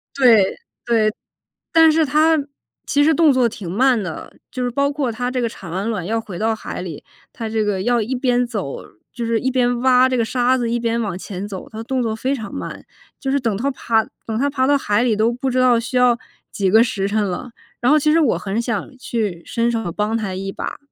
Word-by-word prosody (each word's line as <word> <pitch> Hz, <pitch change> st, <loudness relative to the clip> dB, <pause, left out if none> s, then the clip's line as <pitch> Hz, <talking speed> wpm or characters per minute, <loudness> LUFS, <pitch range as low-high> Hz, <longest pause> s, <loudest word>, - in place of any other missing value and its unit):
对， 230 Hz, -8 st, +5 dB, 0.3 s
对。 220 Hz, -3 st, +2 dB, 0.6 s
但 325 Hz, -1 st, +7 dB
是 320 Hz, 0 st, +3 dB
它 310 Hz, +3 st, +3 dB, 0.5 s
其 290 Hz, -, +2 dB
实 310 Hz, -, +4 dB
动 315 Hz, -3 st, +5 dB
作 250 Hz, -3 st, +3 dB
挺 205 Hz, -6 st, -8 dB
慢 250 Hz, +3 st, +3 dB
的， 180 Hz, -5 st, -7 dB, 0.2 s
就 255 Hz, -, -3 dB
是 245 Hz, -, 0 dB
包 280 Hz, +3 st, +1 dB
括 280 Hz, -4 st, -1 dB
它 245 Hz, +2 st, -3 dB
这 255 Hz, -1 st, -1 dB
个 235 Hz, -, 0 dB
产 185 Hz, -6 st, -10 dB
完 195 Hz, +5 st, -2 dB
卵 205 Hz, -7 st, -3 dB
要 225 Hz, +4 st, -1 dB
回 195 Hz, -6 st, -8 dB
到 220 Hz, +1 st, 0 dB
海 215 Hz, -, -6 dB
里， 165 Hz, -5 st, -7 dB, 0.3 s
它 225 Hz, -2 st, -5 dB
这 220 Hz, -1 st, 0 dB
个 205 Hz, -3 st, -1 dB
要 240 Hz, +3 st, +2 dB
一 225 Hz, +5 st, -3 dB
边 245 Hz, -1 st, +1 dB
走 205 Hz, -, -5 dB, 0.3 s
就 235 Hz, -1 st, -4 dB
是 230 Hz, 0 st, +1 dB
一 260 Hz, -, 0 dB
边 245 Hz, -1 st, +1 dB
挖 255 Hz, 0 st, +5 dB
这 255 Hz, -, 0 dB
个 235 Hz, -, +2 dB
沙 250 Hz, +2 st, +2 dB
子， 240 Hz, -2 st, -1 dB
一 240 Hz, -, 0 dB
边 230 Hz, 0 st, 0 dB
往 200 Hz, -5 st, -3 dB
前 190 Hz, +1 st, -6 dB
走， 190 Hz, -3 st, -7 dB
它 215 Hz, -, -9 dB
的 -, -, -4 dB
动 260 Hz, 0 st, -1 dB
作 220 Hz, -1 st, -1 dB
非 260 Hz, +5 st, -1 dB
常 220 Hz, -6 st, -7 dB
慢。 -, -, -6 dB, 0.3 s
就 270 Hz, -, -2 dB
是 280 Hz, -, +2 dB
等 230 Hz, -6 st, -1 dB
它 275 Hz, +6 st, -1 dB
爬 225 Hz, -3 st, +1 dB, 0.2 s
等 220 Hz, -1 st, -2 dB
它 280 Hz, -, +2 dB
爬 260 Hz, -2 st, 0 dB
到 285 Hz, 0 st, +4 dB
海 210 Hz, -5 st, +1 dB
里 235 Hz, -3 st, +2 dB
都 220 Hz, +3 st, +2 dB
不 260 Hz, +2 st, -2 dB
知 255 Hz, -, -1 dB
道 250 Hz, -2 st, +4 dB
需 245 Hz, +2 st, -3 dB
要 250 Hz, -1 st, +4 dB, 0.3 s
几 195 Hz, -2 st, 0 dB
个 220 Hz, +3 st, +7 dB
时 195 Hz, -5 st, -1 dB
辰 210 Hz, +1 st, +1 dB
了。 200 Hz, +6 st, -4 dB, 0.3 s
然 245 Hz, -, +3 dB
后 305 Hz, -, +6 dB
其 300 Hz, +1 st, +2 dB
实 325 Hz, -, +4 dB
我 295 Hz, -7 st, +2 dB
很 205 Hz, +3 st, -2 dB
想 230 Hz, +1 st, -3 dB
去 215 Hz, -9 st, -3 dB
伸 235 Hz, 0 st, 0 dB
手 225 Hz, -6 st, -2 dB
帮 210 Hz, +5 st, -1 dB
它 205 Hz, -4 st, -3 dB
一 195 Hz, +1 st, -4 dB
把， -, -, -5 dB
235 Hz, 260 characters per minute, -20 LUFS, 210-255 Hz, 0.6 s, 但